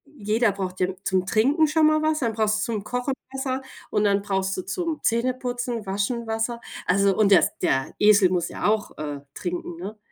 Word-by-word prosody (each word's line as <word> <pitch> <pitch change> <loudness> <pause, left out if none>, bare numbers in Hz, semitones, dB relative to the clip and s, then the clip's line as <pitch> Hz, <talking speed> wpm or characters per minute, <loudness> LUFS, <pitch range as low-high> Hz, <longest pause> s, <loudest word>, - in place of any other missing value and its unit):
jeder 220 -1 +1
braucht 185 -1 -5
ja 180 - +2 0.2
zum 185 -1 +1
Trinken 280 - +3
schon 310 0 +4
mal 310 0 +3
was, 310 0 +1
dann 230 -4 0
brauchst 215 0 +1
du 230 - -2
zum 210 - -3
Kochen 245 +4 -2 0.2
Wasser 265 0 -2 0.3
und 210 - +1
dann 200 -1 +3
brauchst 190 -1 -1
du 185 - -1
zum 315 - -3
Zähneputzen, 245 -1 -1
Waschen 205 +5 -2
Wasser. 225 +2 -2 0.3
Also 195 +1 +3
und 205 -2 +3
der 190 - +6
der 135 0 0
Esel 205 -3 +5
muss 175 -2 0
ja - - -5
auch, 215 0 0
äh, 145 -2 -5
trinken, 175 -2 -4
ne? 200 +5 -7
215 Hz, 195 wpm, -24 LUFS, 190-245 Hz, 0.3 s, der